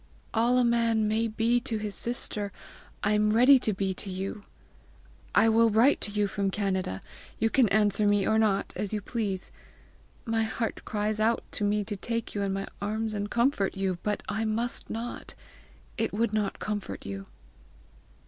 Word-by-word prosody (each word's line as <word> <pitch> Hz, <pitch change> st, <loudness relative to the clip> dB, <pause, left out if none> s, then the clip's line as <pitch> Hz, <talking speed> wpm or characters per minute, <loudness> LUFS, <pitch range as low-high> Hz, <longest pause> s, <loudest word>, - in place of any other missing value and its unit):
"All 235 Hz, +2 st, +3 dB
a 250 Hz, -, +4 dB
man 230 Hz, -2 st, +2 dB
may 220 Hz, +2 st, +1 dB
be 225 Hz, +2 st, +2 dB
to 230 Hz, -2 st, -3 dB
his 210 Hz, -1 st, -4 dB
sister, 210 Hz, -4 st, -2 dB, 0.5 s
I 205 Hz, -, +2 dB
am 210 Hz, 0 st, +3 dB
ready 255 Hz, +4 st, +7 dB
to 225 Hz, -, +1 dB
be 195 Hz, -1 st, -1 dB
to 195 Hz, +2 st, -6 dB
you. 195 Hz, +2 st, -5 dB, 0.9 s
I -, -, +6 dB
will 225 Hz, +1 st, +5 dB
write 230 Hz, +6 st, +4 dB
to -, -, -2 dB
you 210 Hz, 0 st, +1 dB
from 200 Hz, -1 st, -1 dB
Canada; 190 Hz, -, -1 dB, 0.4 s
you 225 Hz, +1 st, +1 dB
can 250 Hz, -6 st, +4 dB
answer 210 Hz, 0 st, +3 dB
me 205 Hz, -1 st, +3 dB
or 220 Hz, 0 st, +3 dB
not 200 Hz, -3 st, +1 dB
as 210 Hz, 0 st, -3 dB
you 210 Hz, -, 0 dB
please. 205 Hz, -3 st, -3 dB, 0.7 s
My 225 Hz, -1 st, +1 dB
heart 220 Hz, +1 st, -2 dB
cries 215 Hz, 0 st, -1 dB
out 225 Hz, +2 st, +2 dB
to -, -, -2 dB
me 205 Hz, 0 st, +2 dB
to 205 Hz, +1 st, -4 dB
take 230 Hz, +3 st, -3 dB
you 205 Hz, -, -2 dB
in 200 Hz, -1 st, 0 dB
my 195 Hz, 0 st, -3 dB
arms 215 Hz, +2 st, -2 dB
and 205 Hz, 0 st, -3 dB
comfort 235 Hz, -6 st, +1 dB
you, 190 Hz, -2 st, -1 dB
but 210 Hz, -1 st, -2 dB
I 210 Hz, +3 st, -1 dB
must 225 Hz, +2 st, -2 dB
not; 230 Hz, +2 st, -5 dB, 0.6 s
it 225 Hz, -, 0 dB
would 225 Hz, +1 st, 0 dB
not 210 Hz, -2 st, 0 dB
comfort 210 Hz, -2 st, -4 dB
you." 100 Hz, 0 st, -6 dB
215 Hz, 180 wpm, -28 LUFS, 200-225 Hz, 0.9 s, ready